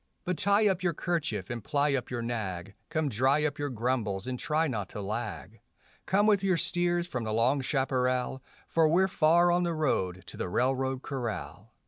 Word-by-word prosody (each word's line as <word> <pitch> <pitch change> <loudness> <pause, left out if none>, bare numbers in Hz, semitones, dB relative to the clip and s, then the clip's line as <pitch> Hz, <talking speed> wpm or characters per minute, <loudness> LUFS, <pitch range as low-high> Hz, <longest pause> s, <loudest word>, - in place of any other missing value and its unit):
But 180 -1 -1
tie 205 +1 +4
up 190 -2 +1
your 175 -3 0
kerchief 150 - -2
and 120 -3 -5
ply 145 +3 +1
up 130 -3 -2
your 120 -2 -3
nag; 100 -6 -4 0.2
Come 160 -2 0
dry 135 +5 +2
up 145 0 -2
your 145 0 -1
grumbles 115 -5 -1
and 125 -1 -4
try 155 +2 +1
not 105 -8 -3
to - - -7
lag; 105 - -5 0.5
Come 205 +2 +3
with 205 -3 +3
your 185 -3 +2
steers 175 +1 +1
from 125 -9 -4
the 110 - -3
long 120 +6 +2
chaparral, 130 -1 0 0.3
For 165 -1 +3
we're 185 +4 +4
far 175 -1 +4
on 175 +1 +2
the 170 -2 0
road 95 - 0
to - - -11
the - - -3
railroad 130 +4 0
corral. 120 - -5
135 Hz, 190 wpm, -29 LUFS, 115-170 Hz, 0.5 s, tie